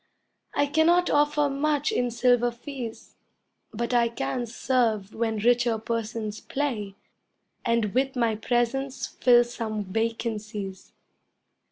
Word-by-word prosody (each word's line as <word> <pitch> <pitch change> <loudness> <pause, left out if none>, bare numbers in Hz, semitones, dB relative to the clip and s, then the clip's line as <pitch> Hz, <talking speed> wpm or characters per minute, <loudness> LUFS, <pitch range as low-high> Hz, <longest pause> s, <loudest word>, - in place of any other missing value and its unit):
I 285 - +3
cannot 325 +4 +3
offer 295 0 +3
much 290 +1 0
in 245 0 +1
silver 245 0 +3
fees, 235 -2 -8 0.5
But 235 +2 -3
I 235 -1 +4
can 235 - -3
serve 225 -4 0
when 225 -1 -1
richer 240 +1 +3
persons 220 -1 -3
play, 225 -9 -3 0.7
And 230 -3 +1
with 265 +2 +1
my 230 -3 +1
presence 245 +4 -1
fill 240 -1 +4
some 225 -3 -4
vacancies. 215 -1 -3
235 Hz, 115 wpm, -26 LUFS, 220-260 Hz, 0.7 s, I